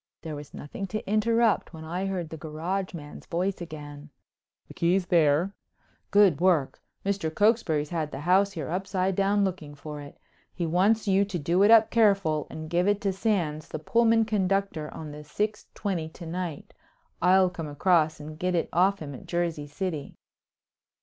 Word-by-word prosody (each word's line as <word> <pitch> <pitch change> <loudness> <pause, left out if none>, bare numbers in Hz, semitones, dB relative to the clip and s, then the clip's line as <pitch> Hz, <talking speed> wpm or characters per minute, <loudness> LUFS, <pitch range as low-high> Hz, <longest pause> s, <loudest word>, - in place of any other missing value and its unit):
There 155 -2 -5
was 145 -1 -9
nothing 195 +7 -6
to 215 +3 -5
interrupt 215 -2 +2
when 160 0 -9
I 180 +4 -2
heard 180 -4 -3
the 160 - -6
garage 170 +5 -3
man's 145 -3 -10
voice 180 +2 -1
again: 150 -2 -8 0.6
"The - - -11
key's 180 +2 +1
there." 165 +2 +3 0.6
"Good 200 -6 +4
work! 175 -7 +2 0.2
Mr. 195 -5 -1
Cokesbury's 170 -7 +2
had 160 -3 -1
the 135 - -7
house 190 +4 +3
here 155 -5 -4
upside 185 +1 -1
down 200 +1 +2
looking 165 -6 -5
for 150 0 -8
it. 145 - -11 0.4
He 175 - -2
wants 200 +7 +2
you 195 0 +4
to 195 -3 -4
do 170 +4 +1
it 205 - +6
up 225 -1 +7
careful 195 -9 +3
and 155 0 -7
give 175 +3 +1
it 205 0 +2
to 195 -2 0
Sands 175 -7 -1
the - - -5
Pullman 225 +7 +3
conductor 195 -6 0
on 155 -2 -7
the 150 +1 -9
six 210 +8 -3
twenty 175 -6 -2
to 170 - -11
night. 170 -2 -5 0.5
I'll 185 +1 +5
come 165 -3 -6
across 155 +1 +2
and 155 +1 -9
get 180 +1 0
it 165 - 0
off 185 +1 +2
him 145 -2 -7
at 130 - -11
Jersey 170 -4 -2
City." 155 -1 -4
175 Hz, 175 wpm, -27 LUFS, 155-195 Hz, 0.6 s, up